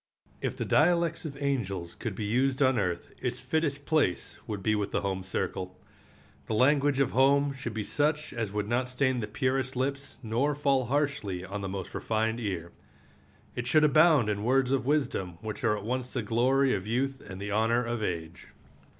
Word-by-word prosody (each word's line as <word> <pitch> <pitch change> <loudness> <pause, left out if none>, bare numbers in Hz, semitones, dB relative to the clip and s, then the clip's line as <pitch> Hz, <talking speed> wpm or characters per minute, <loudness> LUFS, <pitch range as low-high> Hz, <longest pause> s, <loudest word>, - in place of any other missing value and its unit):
If - - -2
the - - -2
dialects 170 +1 +2
of 145 -3 -6
angels 100 -12 -2
could 110 -5 -5
be 105 - -3
used 130 +5 +1
on 130 -4 +3
earth 90 -4 -2
its 125 0 -2
fittest 145 +1 -1
place 150 - +1
would 105 -3 -4
be 110 - +2
the - - -2
home 95 -2 -2
circle. 95 0 -3 0.7
The 110 - -1
language 140 +3 +3
of 140 - +2
home 140 +2 +4
should 125 -5 -6
be 110 - -2
such 150 +5 0
as 115 -5 -3
would 105 0 -2
not 125 +2 0
stain 130 0 +1
the 105 - -3
purest 130 +3 -1
lips 140 +2 -3
nor 120 +6 0
fall 140 -3 +2
harshly 135 -9 -1
on 100 +2 -5
the 95 - -3
most 95 -1 -5
refined 110 +1 -1
ear. 90 -6 -3 0.8
It 125 0 -3
should 155 +4 +4
abound 150 -4 +5
in 105 -1 -1
words 130 +2 +2
of 135 -2 0
wisdom 115 - 0
which 110 +5 -6
are 105 -2 +2
at 100 - -7
once 125 +1 -3
the - - -1
glory 130 +3 +2
of 95 +2 -3
youth 135 +4 -1
and 95 0 -9
the 100 +1 -4
honor 115 +3 +2
of 120 -1 -2
age. 85 -4 -4
125 Hz, 190 wpm, -29 LUFS, 105-140 Hz, 0.8 s, abound